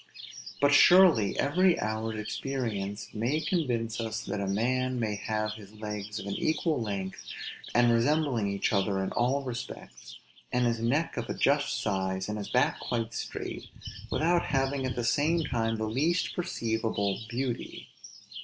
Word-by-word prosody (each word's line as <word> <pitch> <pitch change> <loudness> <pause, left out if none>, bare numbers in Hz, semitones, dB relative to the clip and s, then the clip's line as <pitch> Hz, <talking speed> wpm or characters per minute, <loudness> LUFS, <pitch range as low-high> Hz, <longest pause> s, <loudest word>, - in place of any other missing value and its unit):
But 145 0 +4
surely 165 - +6
every 175 +5 +3
hour's 110 0 -2
experience 110 -3 -3
may 120 +8 0
convince 120 - -1
us 110 -1 -3
that 100 0 -3
a 100 - -1
man 125 +5 0
may 110 -3 0
have 110 +1 -2
his 105 -1 -12
legs 105 -1 -5
of 100 - -5
an 100 - -3
equal 155 - 0
length, 100 -3 -4 0.5
and 120 0 +5
resembling 130 -2 +2
each 100 +2 0
other 95 -1 +1
in 95 - -3
all 130 +4 +1
respects, 120 - -7 0.3
and 125 0 +2
his 115 -1 +1
neck 135 +8 0
of 120 - -3
a - - -2
just 145 +1 +2
size, 95 -2 -1
and 105 0 -3
his 100 - -5
back - - +2
quite 115 -1 -2
straight, - - -5 0.4
without 170 +2 +2
having 135 -1 0
at 125 - -3
the 120 - -2
same 155 +8 +2
time 115 -4 0
the 110 0 -2
least 155 +10 0
perceivable 110 - -1
beauty. 125 0 -4
115 Hz, 155 wpm, -29 LUFS, 105-135 Hz, 0.5 s, surely